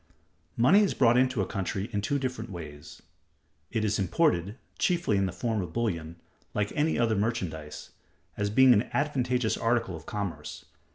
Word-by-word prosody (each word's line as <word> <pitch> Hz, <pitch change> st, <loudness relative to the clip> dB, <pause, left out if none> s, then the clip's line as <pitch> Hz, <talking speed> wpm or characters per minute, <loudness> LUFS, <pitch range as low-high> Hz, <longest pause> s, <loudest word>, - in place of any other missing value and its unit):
Money 140 Hz, -, +6 dB
is 205 Hz, -2 st, +2 dB
brought 120 Hz, -2 st, +4 dB
into 125 Hz, -4 st, +2 dB
a -, -, -2 dB
country 95 Hz, +1 st, -3 dB
in 100 Hz, -, 0 dB
two 125 Hz, +8 st, 0 dB
different 130 Hz, -4 st, -4 dB
ways. 75 Hz, -6 st, -9 dB, 0.7 s
It 110 Hz, -1 st, -1 dB
is 105 Hz, 0 st, 0 dB
imported 100 Hz, -, +1 dB, 0.2 s
(chiefly 170 Hz, -, +1 dB
in 95 Hz, -1 st, +2 dB
the -, -, -4 dB
form 110 Hz, +4 st, -2 dB
of 85 Hz, -3 st, -6 dB
bullion) 85 Hz, -9 st, -2 dB, 0.4 s
like 105 Hz, 0 st, -1 dB
any 155 Hz, +2 st, +1 dB
other 115 Hz, -2 st, +2 dB
merchandise, 90 Hz, -9 st, -3 dB, 0.4 s
as 105 Hz, 0 st, -1 dB
being 130 Hz, +4 st, +6 dB
an 105 Hz, +1 st, +1 dB
advantageous 125 Hz, -5 st, 0 dB
article 115 Hz, -5 st, 0 dB
of 80 Hz, 0 st, -11 dB
commerce. 100 Hz, -4 st, -5 dB
110 Hz, 165 wpm, -28 LUFS, 95-125 Hz, 0.7 s, Money